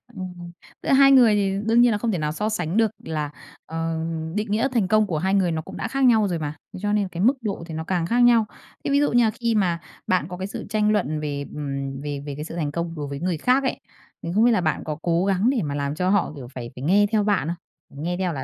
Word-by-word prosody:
Ừm. 180 Hz, -2 st, -7 dB, 0.3 s
Giữa -, -, -3 dB
hai 275 Hz, 0 st, +7 dB
người 245 Hz, -5 st, +6 dB
thì 195 Hz, -2 st, +1 dB
đương 235 Hz, +2 st, +5 dB
nhiên 245 Hz, -, +5 dB
là 210 Hz, -, +1 dB
không 225 Hz, +2 st, -1 dB
thể 185 Hz, -, -1 dB
nào 150 Hz, -1 st, -1 dB
so 210 Hz, +7 st, -2 dB
sánh 180 Hz, -3 st, -2 dB
được 225 Hz, -2 st, +3 dB
là, 150 Hz, -2 st, -3 dB, 0.4 s
ờ, 165 Hz, 0 st, -3 dB, 0.4 s
định 210 Hz, 0 st, -2 dB
nghĩa 225 Hz, +5 st, +2 dB
thành 220 Hz, -7 st, +1 dB
công 215 Hz, +1 st, +3 dB
của 160 Hz, -5 st, -1 dB
hai 190 Hz, +5 st, 0 dB
người 190 Hz, -4 st, +2 dB
nó 160 Hz, -, -2 dB
cũng -, -, -10 dB
đã -, -, -3 dB
khác 270 Hz, 0 st, -1 dB
nhau 220 Hz, -4 st, +5 dB
rồi 175 Hz, -3 st, -2 dB
mà. 150 Hz, -1 st, -4 dB, 0.2 s
Thế -, -, -7 dB
cho 205 Hz, 0 st, +1 dB
nên 205 Hz, -2 st, +1 dB
cái 175 Hz, 0 st, -5 dB
mức 265 Hz, +4 st, +4 dB
độ 210 Hz, -6 st, -3 dB
thì 160 Hz, -, -7 dB
nó 160 Hz, -, -3 dB
càng 175 Hz, 0 st, -1 dB
khác 235 Hz, +8 st, +1 dB
nhau. 240 Hz, -3 st, +5 dB, 0.4 s
Thế -, -, -1 dB
ví 280 Hz, -, +4 dB
dụ 290 Hz, -, +2 dB
như 240 Hz, 0 st, +4 dB
là 220 Hz, -, +3 dB
khi 235 Hz, -1 st, -1 dB
mà 175 Hz, -5 st, +1 dB, 0.3 s
bạn 185 Hz, -5 st, +2 dB
có 180 Hz, 0 st, -7 dB
cái 190 Hz, -, -4 dB
sự -, -, -7 dB
tranh 210 Hz, 0 st, +2 dB
luận 155 Hz, -8 st, 0 dB
về, 145 Hz, -2 st, -3 dB
ừm, 140 Hz, -2 st, -4 dB
về 145 Hz, -1 st, -4 dB
về 145 Hz, -2 st, -5 dB
cái 150 Hz, -, -5 dB
sự 165 Hz, -, -7 dB
thành 150 Hz, -4 st, -2 dB
công 170 Hz, +1 st, -3 dB
đối 145 Hz, -2 st, -4 dB
với 140 Hz, 0 st, -5 dB
người 175 Hz, 0 st, -1 dB
khác 255 Hz, -, +2 dB
ấy, 265 Hz, -, -1 dB, 0.4 s
thì 170 Hz, -, -4 dB
không 220 Hz, +3 st, +5 dB
biết 245 Hz, -, +5 dB
là 215 Hz, -, +2 dB
bạn 155 Hz, -2 st, -1 dB
có 150 Hz, -1 st, -4 dB
cố 170 Hz, +1 st, +1 dB
gắng 195 Hz, +4 st, +2 dB
để 260 Hz, -4 st, +1 dB
mà 145 Hz, -2 st, -3 dB
làm 140 Hz, +1 st, -2 dB
cho 180 Hz, +2 st, 0 dB
họ, 195 Hz, -5 st, +1 dB
kiểu, 130 Hz, -4 st, -8 dB
phải 120 Hz, -1 st, -7 dB
phải 125 Hz, -, -8 dB
nghe 200 Hz, +7 st, +4 dB
theo 215 Hz, -2 st, +2 dB
bạn 205 Hz, -6 st, +1 dB
không? 165 Hz, -4 st, -9 dB
Nghe 175 Hz, +1 st, -1 dB
theo 180 Hz, -2 st, -1 dB
là 135 Hz, -3 st, -4 dB
180 Hz, 295 wpm, -23 LUFS, 155-215 Hz, 0.4 s, hai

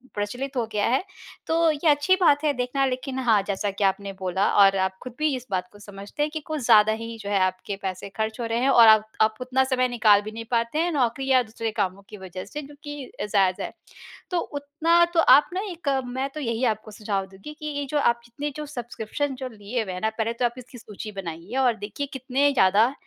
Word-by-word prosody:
प्रचलित 245 Hz, +7 st, -4 dB
हो 240 Hz, -, +1 dB
गया 210 Hz, -1 st, 0 dB
है। 260 Hz, +8 st, +1 dB, 0.4 s
तो 330 Hz, 0 st, +3 dB
ये 305 Hz, +2 st, +1 dB
अच्छी 295 Hz, +6 st, +4 dB
बात 290 Hz, -4 st, +4 dB
है 300 Hz, -2 st, +2 dB
देखना, 250 Hz, +2 st, 0 dB
लेक़िन 260 Hz, 0 st, -3 dB
हाँ 225 Hz, -5 st, +3 dB
जैसा 200 Hz, 0 st, -1 dB
कि 200 Hz, +1 st, -3 dB
आपने 195 Hz, 0 st, 0 dB
बोला 190 Hz, +1 st, 0 dB
और 195 Hz, 0 st, +5 dB
आप 190 Hz, 0 st, -1 dB
ख़ुद 255 Hz, -, -8 dB
भी 305 Hz, -2 st, +1 dB
इस 255 Hz, 0 st, -8 dB
बात 180 Hz, -1 st, -1 dB
को 205 Hz, -, -16 dB
समझते 205 Hz, +6 st, -5 dB
हैं 300 Hz, -, 0 dB
कि 315 Hz, -, -3 dB
कुछ 310 Hz, -2 st, -3 dB
ज़्यादा 215 Hz, 0 st, +6 dB
ही 230 Hz, 0 st, -7 dB
जो 200 Hz, -, -5 dB
है 200 Hz, -1 st, +2 dB
आपके 185 Hz, +2 st, -1 dB
पैसे 190 Hz, 0 st, -5 dB
ख़र्च 220 Hz, +2 st, -2 dB
हो 235 Hz, -, -2 dB
रहे 230 Hz, +1 st, -1 dB
हैं 260 Hz, +2 st, +2 dB
और 235 Hz, -4 st, +7 dB
आप 215 Hz, -1 st, +7 dB, 0.2 s
आप 215 Hz, 0 st, +3 dB
उतना 255 Hz, +1 st, +1 dB
समय 260 Hz, -1 st, +1 dB
निकाल 215 Hz, -4 st, +4 dB
भी 215 Hz, +1 st, -7 dB
नहीं 225 Hz, +1 st, -7 dB
पाते 235 Hz, +5 st, 0 dB
हैं 345 Hz, +2 st, +1 dB
नौकरी 265 Hz, -2 st, 0 dB
या 255 Hz, -1 st, +5 dB
दूसरे 225 Hz, 0 st, -4 dB
कामों 195 Hz, -2 st, -2 dB
की 210 Hz, -, -9 dB
वजह 185 Hz, -1 st, -8 dB
से 295 Hz, +9 st, -6 dB
जो 290 Hz, 0 st, -12 dB
कि 290 Hz, -3 st, -7 dB
जायज़ 195 Hz, -3 st, +1 dB
है। -, -, -4 dB, 0.6 s
तो 360 Hz, -, +1 dB
उतना 310 Hz, +4 st, +1 dB
तो 335 Hz, -, +3 dB
आप 295 Hz, -2 st, +6 dB
न -, -, -3 dB
एक, 335 Hz, -4 st, -4 dB, 0.2 s
मैं 260 Hz, +2 st, -3 dB
तो 305 Hz, -, -8 dB
यही 230 Hz, -3 st, -2 dB
आपको 215 Hz, -2 st, -2 dB
सुझाव 205 Hz, -2 st, -3 dB
दूँगी 195 Hz, +10 st, -11 dB
कि 305 Hz, -, -8 dB
ये 285 Hz, -1 st, -3 dB
जो 300 Hz, -, 0 dB
आप 235 Hz, -4 st, +2 dB
इतने 290 Hz, +5 st, -5 dB
जो 300 Hz, -, -5 dB
सब्सक्रिप्शन 260 Hz, 0 st, -4 dB
जो 260 Hz, 0 st, -5 dB
लिए 220 Hz, +1 st, -4 dB
हुए 190 Hz, -3 st, -6 dB
हैं 180 Hz, -, -6 dB
ना, 220 Hz, -, +1 dB
पहले 220 Hz, +1 st, -2 dB
तो 245 Hz, +1 st, -1 dB
आप 240 Hz, -, 0 dB
इसकी 250 Hz, 0 st, -11 dB
सूची 215 Hz, -1 st, -8 dB
बनाइए 185 Hz, +2 st, -7 dB
और 250 Hz, -3 st, +3 dB
देखिए 215 Hz, +7 st, -5 dB
कितने 265 Hz, +2 st, +1 dB
ज़्यादा 215 Hz, +3 st, +4 dB
235 Hz, 240 wpm, -25 LUFS, 205-275 Hz, 0.6 s, और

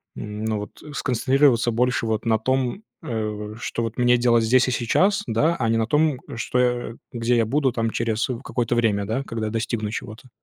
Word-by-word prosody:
ну, 105 Hz, +1 st, -3 dB
вот 105 Hz, -, -9 dB
сконцентрироваться 130 Hz, -2 st, +2 dB
больше 125 Hz, +1 st, +1 dB
вот 110 Hz, 0 st, -1 dB
на 110 Hz, -1 st, +3 dB
том, 130 Hz, -, -1 dB, 0.2 s
э, 110 Hz, -5 st, -4 dB
что 115 Hz, -, -3 dB
вот 115 Hz, 0 st, -4 dB
мне 125 Hz, 0 st, +4 dB
делать 120 Hz, -1 st, +3 dB
здесь 125 Hz, +3 st, +4 dB
и -, -, 0 dB
сейчас, 185 Hz, -, +2 dB
да, 135 Hz, +9 st, +2 dB
а 115 Hz, -, 0 dB
не 115 Hz, -, +2 dB
на 110 Hz, -1 st, 0 dB
том, 150 Hz, 0 st, +2 dB, 0.2 s
что 120 Hz, 0 st, 0 dB, 0.2 s
где 120 Hz, 0 st, +1 dB
я 115 Hz, -, +3 dB
буду 135 Hz, +1 st, +1 dB
там 115 Hz, -2 st, 0 dB
через, 115 Hz, 0 st, -1 dB
э, 125 Hz, -, -2 dB
какое-то 120 Hz, -1 st, -1 dB
время, 105 Hz, -4 st, +1 dB
да, 115 Hz, +6 st, -2 dB
когда 110 Hz, -4 st, -3 dB
достигну 115 Hz, -1 st, -2 dB
чего-то? 110 Hz, +3 st, -7 dB
115 Hz, 190 wpm, -23 LUFS, 110-125 Hz, 0.2 s, мне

